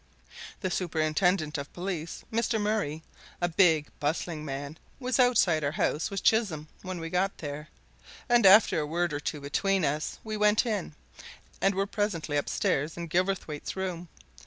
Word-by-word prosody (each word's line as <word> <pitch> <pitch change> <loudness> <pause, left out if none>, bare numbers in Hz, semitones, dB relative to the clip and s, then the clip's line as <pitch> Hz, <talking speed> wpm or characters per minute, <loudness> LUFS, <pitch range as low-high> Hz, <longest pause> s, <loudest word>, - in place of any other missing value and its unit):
The 185 -2 -1
superintendent 160 -1 +1
of 140 - -7
police, 175 -3 -4
Mr. 230 0 +1
Murray, 205 -8 -1 0.4
a 175 - +1
big, 165 -4 +4
bustling 155 +1 -2
man, 140 +2 -6 0.2
was 255 0 -1
outside 210 -11 +4
our 145 +1 0
house 155 -1 0
with 195 -1 -4
Chisholm 190 -10 +2
when 185 -2 -5
we 165 - -4
got 190 +2 0
there, 150 0 -6 0.6
and 240 -2 +4
after 200 -3 +7
a 150 - -2
word 170 +1 -1
or 145 - -2
two 150 0 -3
between 190 +5 +1
us, 150 +2 -2
we 215 -1 -4
went 210 +2 +4
in, 205 -9 -2 0.7
and 195 0 +3
were 195 +1 +1
presently 200 -8 -2
upstairs 145 +1 0
in 170 -1 -5
Gilverthwaite's 175 -4 -1
room. 180 -2 -4
175 Hz, 160 wpm, -28 LUFS, 155-195 Hz, 0.7 s, after